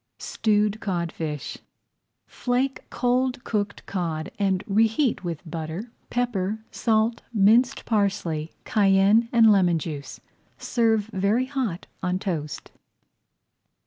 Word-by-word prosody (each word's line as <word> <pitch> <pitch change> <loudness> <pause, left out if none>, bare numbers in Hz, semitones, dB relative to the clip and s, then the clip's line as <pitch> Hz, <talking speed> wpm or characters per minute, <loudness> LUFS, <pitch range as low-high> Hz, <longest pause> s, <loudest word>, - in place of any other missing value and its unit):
STEWED 210 -1 0
CODFISH 170 -6 -3 0.7
Flake 255 +2 -2
cold 250 +1 0
cooked 205 -2 -2
cod 165 -4 -3
and 195 -1 +1
reheat 225 +4 +2
with 170 -1 -5
butter, 165 +7 -5 0.2
pepper, 220 -3 -1
salt, 225 0 +1
minced 230 +3 +3
parsley, 195 -7 0
cayenne, 200 +3 +4
and 230 -2 +6
lemon 180 -4 +4
juice. 145 -4 -6 0.4
Serve 225 -4 +1
very 200 +6 +1
hot 260 -10 -3 0.2
on 180 0 0
toast. 160 -8 -4
205 Hz, 100 wpm, -25 LUFS, 175-230 Hz, 0.7 s, and